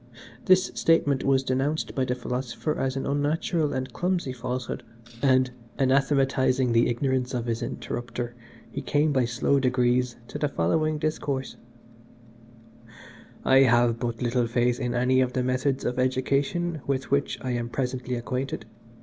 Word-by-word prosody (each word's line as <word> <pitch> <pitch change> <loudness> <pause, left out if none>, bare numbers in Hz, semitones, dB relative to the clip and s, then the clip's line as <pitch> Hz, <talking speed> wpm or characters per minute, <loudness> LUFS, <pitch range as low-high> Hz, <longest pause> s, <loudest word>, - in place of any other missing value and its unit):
This 185 0 +4
statement 145 -5 +2
was 135 -1 +3
denounced 135 +4 -1
by 130 - 0
the 125 0 -1
Philosopher 125 +4 -3
as 135 0 -1
an 135 - -2
unnatural 150 +2 0
and 130 -1 -3
clumsy 175 -7 -1
falsehood, 125 0 -4 0.4
and, 130 -2 +3 0.3
anathematising 135 -1 +2
the 115 +1 +4
ignorance 130 +1 0
of 120 -1 -2
his 115 -1 -2
interrupter, 120 0 -4 0.4
he - - -4
came 150 +1 +1
by 130 -3 +3
slow 130 +4 +1
degrees 125 -1 +1
to 150 - -5
the 150 - +1
following 155 - +1
discourse 145 -3 -2 1.9
"I 130 - +5
have 120 -3 +4
but 120 0 -3
little 120 0 +1
faith 120 +1 +1
in 125 -2 -2
any 130 +1 +3
of 125 -1 0
the 130 - 0
methods 130 +2 0
of 125 +1 -1
education 140 +6 0
with 135 -1 -2
which 140 0 +1
I 130 - -2
am 120 -1 -2
presently 125 0 -2
acquainted. 125 0 -3
130 Hz, 150 wpm, -26 LUFS, 125-140 Hz, 1.9 s, I